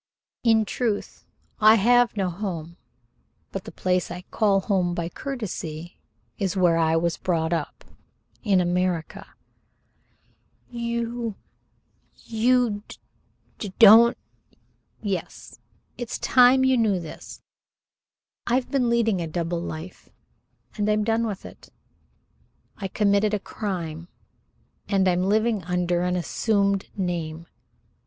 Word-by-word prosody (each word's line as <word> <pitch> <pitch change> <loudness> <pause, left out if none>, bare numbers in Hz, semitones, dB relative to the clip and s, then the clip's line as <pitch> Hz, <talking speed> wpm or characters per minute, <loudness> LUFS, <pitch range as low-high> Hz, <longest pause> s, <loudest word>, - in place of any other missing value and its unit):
"In 225 -2 +4
truth, 220 -1 -3 0.3
I 215 +1 +7
have 240 +2 +3
no 190 -3 0
home, 170 -3 -5 0.7
but - - -6
the - - -8
place 180 -1 -1
I 180 +1 -7
call 200 -3 +2
home 185 -3 0
by 170 -1 -3
courtesy 175 - -6 0.4
is 195 -2 -1
where 175 -3 +3
I 160 0 +2
was 165 0 0
brought 165 -2 -1
up 160 -3 -4 0.6
in 200 -5 +2
America." 180 -2 -1 1.4
"You 235 -1 -3 0.8
you 230 -1 +1
d - - -11 0.6
d 200 -3 -6
don't 230 +2 +8 0.5
" - - -42
"Yes 185 - -7 0.4
it's 240 -2 -4
time 255 +1 +5
you 260 -1 +3
knew 210 -5 +2
this. 165 -3 -10 1.0
I've 245 +1 0
been 260 -4 +1
leading 225 -5 +1
a 165 - -3
double 170 +1 -3
life, 165 +1 -8 0.7
and 210 0 0
I'm 210 0 +2
done 225 +1 +1
with 200 -3 -6
it. - - -13 1.1
I 195 - -5
committed 205 +1 +2
a - - -2
crime, 170 -6 -5 0.8
and 195 -2 +2
I'm 180 0 +2
living 215 +1 +1
under 175 0 0
an 180 0 0
assumed 200 +2 0
name. 170 -3 -3
195 Hz, 120 wpm, -24 LUFS, 175-225 Hz, 1.4 s, don't